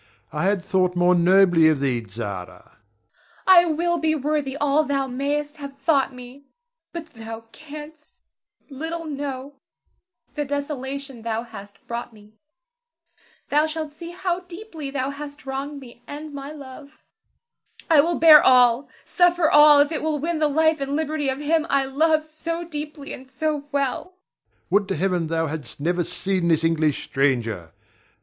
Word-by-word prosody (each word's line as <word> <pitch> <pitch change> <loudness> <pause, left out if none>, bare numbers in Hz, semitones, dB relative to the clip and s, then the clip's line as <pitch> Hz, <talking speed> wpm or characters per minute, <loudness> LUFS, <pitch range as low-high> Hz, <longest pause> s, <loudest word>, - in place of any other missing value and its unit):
I - - -1
had 195 -2 +1
thought 185 -2 +1
more 175 +1 +4
nobly 175 -2 +5
of 155 -3 +1
thee, 130 -3 0
Zara. 115 -3 -12 0.4
Zara. - - -19 0.7
I 360 -2 +7
will 345 +1 0
be 315 0 +1
worthy 290 -1 -1
all 290 +1 +2
thou 275 -2 0
mayst 290 +4 -2
have 280 -2 -9
thought 275 -1 +2
me; 250 +2 -12 0.5
but 340 -1 -6
thou 225 0 -8
canst 305 0 -11 0.5
little 325 +4 -5
know 280 -2 -5 0.8
the 295 - -2
desolation 280 -2 -5
thou 225 0 -2
hast 205 -4 -12
brought 235 0 -5
me. 210 0 -18 1.2
Thou 300 +2 +3
shalt 315 -1 -4
see 335 +3 -9
how 355 0 -2
deeply 350 -4 -8
thou 275 0 -2
hast 285 0 -9
wronged 275 +2 -4
me, 240 -3 -14
and 295 +1 -8
my 280 +1 -7
love. 280 0 -12 0.8
I 315 -3 +6
will 335 +2 0
bear 310 -2 +9
all, 250 0 +5 0.2
suffer 350 -3 +3
all, 295 -1 +8
if 290 +2 +1
it 310 - -2
will 310 -1 -1
win 320 +2 -2
the 305 - +3
life 315 +1 +2
and 275 +1 -2
liberty 310 -2 -1
of 265 +1 -2
him 315 +2 +1
I 275 -1 +2
love 310 +3 +2
so 330 +2 -5
deeply 295 -2 -7
and 260 +1 -11
so 295 +1 -2
well. 275 -3 -1
Ber. 365 - -21 0.6
Would 205 0 +3
to 195 - -1
Heaven 175 0 0
thou 165 0 0
hadst 155 -2 -6
never 175 +4 0
seen 185 +1 -2
this 165 -1 +2
English 160 -3 +1
stranger! 115 - -1
280 Hz, 160 wpm, -23 LUFS, 225-310 Hz, 1.2 s, bear